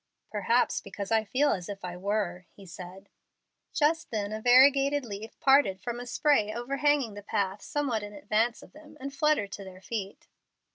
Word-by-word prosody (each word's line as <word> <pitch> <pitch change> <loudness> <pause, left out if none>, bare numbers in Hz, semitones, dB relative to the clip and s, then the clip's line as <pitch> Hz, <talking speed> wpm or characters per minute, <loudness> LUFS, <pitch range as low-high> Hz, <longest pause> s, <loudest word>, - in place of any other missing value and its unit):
"Perhaps 225 +4 +1
because 200 +1 -7
I 220 -1 +3
feel 270 +7 +2
as 180 -1 -3
if 200 -2 -6
I 175 -1 -5
were," 185 -2 -2
he 200 - -15
said. 185 +2 -10 0.6
Just 320 +1 +1
then 210 -2 -2
a 215 0 -4
variegated 275 +3 +5
leaf 215 0 -8
parted 270 -9 +4
from 240 +4 -4
a 245 - -7
spray 240 -6 +2
overhanging 275 +1 0
the 205 - -8
path 200 -1 -2
somewhat 280 -7 -1
in 205 0 -7
advance 215 +3 0
of - - -17
them, 305 0 -15
and 275 +1 -6
fluttered 280 -8 +1
to 200 - -7
their 185 -1 -11
feet. 200 -1 -6
220 Hz, 180 wpm, -28 LUFS, 200-275 Hz, 0.6 s, variegated